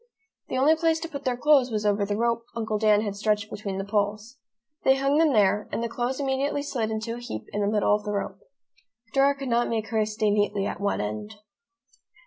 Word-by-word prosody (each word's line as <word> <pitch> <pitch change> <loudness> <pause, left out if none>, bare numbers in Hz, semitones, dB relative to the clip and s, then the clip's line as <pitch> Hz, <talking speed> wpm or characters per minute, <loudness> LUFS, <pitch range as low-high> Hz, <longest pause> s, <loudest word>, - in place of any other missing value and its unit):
The - - -2
only 290 +5 +5
place 325 0 +1
to 330 - -3
put 280 -3 -8
their 250 -1 0
clothes 275 -1 +4
was 215 -2 -2
over 205 0 +2
the 205 0 -1
rope 230 0 0
Uncle 220 -2 -2
Dan 210 -1 +4
had 205 -2 -3
stretched 210 +1 0
between 200 -2 -4
the 195 - -2
poles. 210 +4 -2 0.4
They 265 - +5
hung 275 +2 +2
them 320 -2 +4
there, 210 -2 +2
and 230 - -2
the - - 0
clothes 245 +3 -2
immediately 275 +1 -1
slid 245 -6 -2
into 220 +1 -3
a 240 - -6
heap 110 - -6
in 205 - -1
the 200 - +1
middle 210 0 +2
of 210 0 0
the 210 - -3
rope. 200 - -3 0.7
Dora 275 +1 +4
could 275 -2 -5
not 235 0 +2
make 220 -1 -2
hers 215 -2 0
stay 215 -1 +1
neatly 205 -1 +1
at - - -4
one 200 - 0
end. 110 - -5
220 Hz, 225 wpm, -26 LUFS, 210-265 Hz, 0.7 s, only